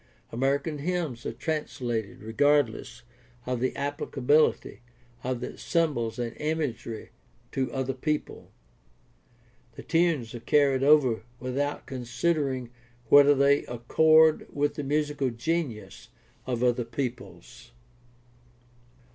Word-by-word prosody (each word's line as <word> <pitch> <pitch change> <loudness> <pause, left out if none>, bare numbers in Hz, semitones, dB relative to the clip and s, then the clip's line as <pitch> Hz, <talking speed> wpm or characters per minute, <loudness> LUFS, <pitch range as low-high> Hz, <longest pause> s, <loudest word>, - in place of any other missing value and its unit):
American 140 +5 -1
hymns 160 -6 -3
are - - -2
translated 120 -10 -4
regardless 125 0 +1 0.4
of 125 -1 -2
the 130 +2 0
appHcability 145 0 +1 0.4
of 125 -1 -2
the - - -6
symbols 135 -10 0
and 120 -1 -4
imagery 150 -7 -3 0.4
to 130 -1 -1
another 135 -1 -2
people. 150 +4 -3 1.3
The - - -9
tunes 165 -9 +1
are 120 - -6
carried 135 +1 +2
over 135 -5 +4 0.2
withoutconsidering 130 0 -2 0.4
whether 145 0 +7
they 140 +1 +3
accord 155 +6 +4
with 145 0 0
the 145 - -5
musical 145 -1 0
genius 120 -1 -4 0.4
of 125 -1 -1
other 125 0 +2
peoples. 125 +1 -6
135 Hz, 100 wpm, -27 LUFS, 120-150 Hz, 1.3 s, whether